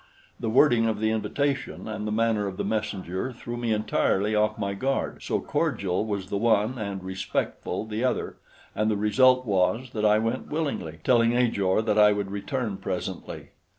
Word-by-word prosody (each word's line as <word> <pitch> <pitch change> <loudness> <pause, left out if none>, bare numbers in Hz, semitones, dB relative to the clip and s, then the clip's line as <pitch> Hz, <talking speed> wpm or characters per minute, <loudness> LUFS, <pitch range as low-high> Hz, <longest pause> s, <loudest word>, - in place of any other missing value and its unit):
The 115 - -2
wording 120 -1 +4
of 110 -2 -1
the 110 0 +1
invitation 140 +5 -2
and 110 0 -4
the - - -2
manner 110 -2 +1
of 95 -1 -6
the - - -1
messenger 105 0 -2
threw 120 0 -7
me 120 -1 -2
entirely 105 -1 +1
off 105 +1 +2
my 100 -2 -2
guard, 135 +7 -2
so - - -1
cordial 95 +2 -1
was 100 -3 -4
the 100 - 0
one 115 +2 +2
and 100 -3 -4
respectful 95 +3 -3
the 110 +2 -3
other, 130 - -1 0.4
and 105 +1 +1
the 105 - +1
result 130 +5 +4
was 110 +5 +1
that 110 - -3
I 105 0 +5
went 115 +4 -2
willingly, 140 - -3
telling 120 -2 +4
Ajor 110 -4 +2
that 105 -1 +1
I 105 0 +7
would 100 -1 -3
return 105 +1 -3
presently. - - -5
110 Hz, 180 wpm, -26 LUFS, 100-120 Hz, 0.4 s, I